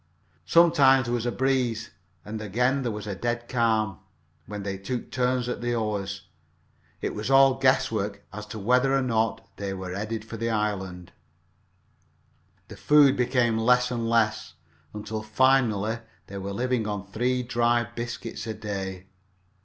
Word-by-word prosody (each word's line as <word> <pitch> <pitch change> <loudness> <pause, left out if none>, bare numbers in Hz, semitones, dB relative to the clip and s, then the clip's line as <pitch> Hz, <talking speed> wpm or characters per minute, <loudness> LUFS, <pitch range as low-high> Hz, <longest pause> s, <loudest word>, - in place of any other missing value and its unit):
Sometimes 140 -6 +5
there 120 - -2
was 120 0 -1
a - - 0
breeze, 125 -4 0 0.3
and 110 +1 -5
again 125 +6 +1
there 120 -3 -2
was 105 -1 -6
a 105 - -3
dead 120 +4 -3
calm, 110 -4 +1 0.5
when 105 -1 -6
they 100 -1 -3
took 120 +5 -5
turns 125 -1 0
at 125 - -3
the 120 0 -1
oars. 100 -3 -3 0.8
It - - -2
was 105 +3 -4
all 135 0 +6
guesswork 105 -6 +1
as 105 0 -7
to 105 - -7
whether 125 +6 +2
or 135 - +1
not 115 -3 0
they 100 -1 -4
were 95 -1 -6
headed 110 +2 -4
for 115 - -7
the 115 +1 -2
island. 95 -5 -2 1.6
The - - -11
food 145 -2 +5
became 120 -2 +1
less 125 +2 +3
and 115 -2 -2
less, 115 -2 +1 0.4
until 105 +1 -5
finally 115 -2 +2 0.3
they 100 0 -7
were 100 +1 -5
living 120 +1 -1
on 105 -2 -3
three 125 +6 -1
dry 120 -1 +2
biscuits 120 -1 -6
a 110 - -3
day 95 -3 -5
each. - - -27
115 Hz, 160 wpm, -26 LUFS, 105-125 Hz, 1.6 s, all